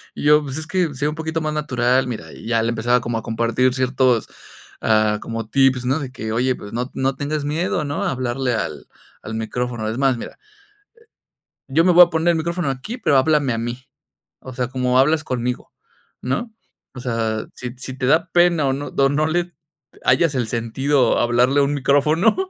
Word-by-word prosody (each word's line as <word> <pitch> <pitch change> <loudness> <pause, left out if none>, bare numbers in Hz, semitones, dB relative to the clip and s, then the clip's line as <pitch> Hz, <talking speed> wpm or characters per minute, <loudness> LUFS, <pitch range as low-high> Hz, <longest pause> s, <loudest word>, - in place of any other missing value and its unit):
y - - -6
yo: 150 0 +5
"Pues, 135 0 -5
es 155 - -5
que 175 -5 0
sé 145 +3 -1
un 150 - -2
poquito 160 0 -3
más 155 -1 -2
natural, 130 -4 +1
mira", 120 -3 -6
y - - -11
ya 115 -1 +2
le 115 - 0
empezaba 120 +2 +1
como 120 -1 -2
a - - -11
compartir 115 +2 +1
ciertos, 130 -2 +1 0.5
ah, 110 -1 +2
como 115 -1 -5
tips, 135 -1 +3
¿no?, 135 +5 +1
de 135 -3 -6
que: 110 -4 -5
"Oye, 125 +2 +1
pues, 100 +2 -10
no 125 +3 -2
no 135 0 0
tengas 145 0 -3
miedo, 155 +1 -1
¿no?, 145 +8 -3
a 190 - 0
hablarle 125 0 -1
al - - -4 0.3
al 110 - -6
micrófono, 115 0 -3
es 115 - -4
más, 135 -3 +2
mira" - - -8 1.3
"yo 160 +5 +3
me 180 - +5
voy 175 +1 +9
a 170 - -9
poner 165 +1 +1
el 165 - -1
micrófono 170 -2 -2
aquí, 175 - -5
pero 145 - +2
háblame 145 -2 +2
a 115 - -2
mí, 120 +3 -5 0.5
o 130 - -9
sea, 125 -1 -2
como 125 0 0
hablas 155 +3 +3
conmigo, 125 -2 -3 0.5
¿no?, 140 - -2 0.4
o - - -6
sea, 115 -3 -2
si 125 0 -6
si 130 +1 -6
te 130 - -1
da 165 +5 +2
pena 175 -4 +3
o - - +1
no 140 +2 -4
o 135 0 +4
no 150 +2 +1
le 175 +2 -1 0.5
hallas 140 +4 +3
el 120 -3 0
sentido 125 +3 +1
a - - +2
hablarle 125 +4 +3
a 140 - +4
un 145 +1 -1
micrófono", 150 - +2
130 Hz, 210 wpm, -21 LUFS, 120-150 Hz, 1.3 s, voy